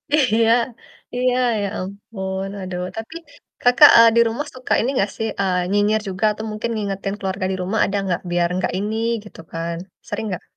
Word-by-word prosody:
Iya 230 -6 +3 0.7
iya, 250 0 +2 0.3
ya 200 - -1
ampun, 190 0 -5
aduh. 185 -1 -4
Tapi, 225 +9 -7 0.5
Kakak, 245 +4 +8
eee, 230 0 +9
di 235 - +6
rumah 265 +7 -3
suka 255 0 -2
ini 245 - 0
nggak 200 -3 +1
sih, 225 - -1
eee, 180 -2 0
nyinyir 205 +1 +2
juga 190 +3 -1
atau 215 +1 -6
mungkin 215 +2 -3
ngingetin 195 -2 -3
keluarga 190 -1 -3
di - - -1
rumah 195 +5 -1
ada 200 - -1
nggak? 180 -3 -1
Biar, 175 0 +2
nggak 185 - -1
ini, 210 +3 -2 0.3
gitu 210 - -14
kan, 165 +1 -3 0.3
sering - - -3
nggak? 180 - -4
205 Hz, 180 wpm, -21 LUFS, 190-225 Hz, 0.7 s, eee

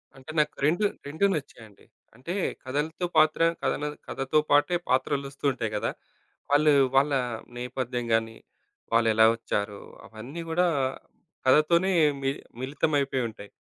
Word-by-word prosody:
అంటే 135 +3 -10
నాకు 150 - +2
రెండు, 175 +7 +2 0.2
రెండు 160 +7 0
నచ్చాయండి. 110 -8 -9 0.3
అంటే 130 +9 -6 0.3
కథలతో 150 +6 -2
పాత్ర, 155 +1 +4 0.2
కథన 140 +2 -1 0.2
కథతో 135 +3 0
పాటే 145 +5 +4
పాత్రలోస్తూంటాయి 135 -3 -1
గదా! 105 - -1 0.6
వాళ్ళు 150 +1 +5 0.2
వాళ్ళ 140 +2 +4 0.5
నేపథ్యం 125 -1 -3
గాని, 115 0 0 0.6
వాళ్లెలా 110 -1 +5
వచ్చారు? 100 -2 -3 0.3
అవన్నీ 125 +10 -8
గూడా 180 +2 +2 0.8
కథతోనే 170 +7 +4 0.3
మి 135 - +1 0.3
మిళితంమైపోయి 140 -1 0
ఉంటాయి. 105 -2 -12
135 Hz, 110 wpm, -27 LUFS, 120-155 Hz, 0.8 s, వాళ్ళు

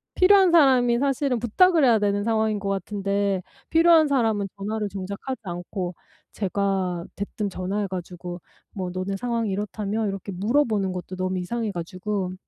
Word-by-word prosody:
필요한 380 -1 +6
사람이 255 -7 +5
사실은 275 -2 0
부탁을 320 - +4
해야 235 -4 +5
되는 205 0 +1
상황인 220 -1 +1
것 200 0 -3
같은데 200 0 -1 0.3
필요한 330 -1 +6
사람은 225 -7 +1
전화를 210 +1 -2
정작 195 +1 -5
하지 260 -3 -4
않고 175 0 -5 0.4
제가 190 -3 -1
대뜸 205 +1 -3
전화해 195 +2 -2
가지고 175 -1 -6 0.3
뭐 185 -3 -4
"너네 185 +2 -3
상황이 230 -1 -1
이렇다며?" 210 +2 -2
이렇게 195 0 -5
물어 220 +11 +2
보는 200 -4 -1
것도 180 +1 -6
너무 185 0 -2
이상해 220 +4 -2
가지고 185 +2 -3
205 Hz, 360 characters per minute, -24 LUFS, 185-235 Hz, 0.4 s, 필요한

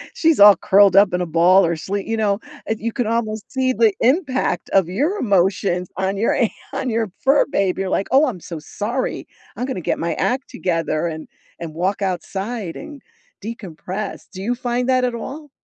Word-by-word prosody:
She's 325 -7 +2
all 205 0 +9
curled 195 -1 +5
up 195 -2 +6
in 180 - 0
a - - 0
ball 175 +4 +4
or 170 0 0
slee 195 +5 -4
you 225 - -1
know, 205 -1 +1 0.3
and 220 0 -2
you 230 +1 -3
can 245 -4 -1
almost 220 -2 -2
see 260 -1 +1
the 225 -4 +3
impact 260 - +1
of 190 -3 +3
your 295 - 0
emotions 185 - +1
on 190 +1 -1
your 225 - +1
an 235 - +2 0.2
on 270 -1 -2
your 225 -3 -1
fur 275 +2 +4
baby. 195 -1 0
You're 190 - -2
like, 195 - 0
"Oh, 275 +4 +5
I'm 210 -8 -4
so 165 -3 -7
sorry. 225 - -4 0.3
I'm 250 - -2
gonna 220 -9 -4
get - - -1
my 170 0 -1
act 255 +2 -1
together 165 -2 -1
and 160 -1 -6 0.3
and 165 -2 -6
walk 190 +4 -1
outside 190 +2 -3
and 290 -3 -10 0.4
decompress." 195 -2 -6
Do 190 - -7
you 245 +3 0
find 245 0 -2
that 255 -1 +3
at 245 -1 -2
all? 295 +5 -7
205 Hz, 200 wpm, -20 LUFS, 185-245 Hz, 0.4 s, all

